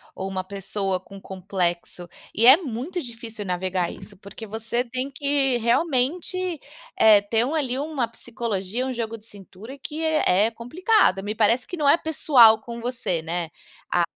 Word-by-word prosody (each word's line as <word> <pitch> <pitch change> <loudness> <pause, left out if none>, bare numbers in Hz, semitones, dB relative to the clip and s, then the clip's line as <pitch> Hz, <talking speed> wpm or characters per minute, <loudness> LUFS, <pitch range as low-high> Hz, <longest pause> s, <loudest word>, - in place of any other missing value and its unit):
ou 190 - -4
uma 190 -1 -3
pessoa 195 -1 -3
com 195 +1 -13
complexo, 180 -2 -3 0.2
e 230 +3 +3
é 265 +5 +10
muito 305 +3 -5
difícil 230 -5 -8
navegar 180 -1 -1
isso, 200 -3 -13
porque 200 +3 -10
você 225 +3 -2
tem 255 +2 -5
que 275 -2 +1
realmente, 320 - 0 0.4
eh, 210 -2 +7
ter 225 +3 0
uma 315 +4 -1
ali 260 -2 -2
uma 285 -5 -2
psicologia, 230 0 -4
um 260 - -3
jogo 230 -1 -4
de 215 - -21
cintura, 205 +5 -12
que 300 +3 -6
é 225 -11 +3
é 230 - -5
complicado. 245 - +1
Me 210 +1 -4
parece 230 +3 +2
que 360 - -6
não 295 -2 +1
é 285 - +7
pessoal 255 -9 +5
com 235 +1 -8
você, 235 -9 -2
né. 165 0 -4 0.4
A 175 - +2
230 Hz, 170 wpm, -24 LUFS, 195-270 Hz, 0.4 s, é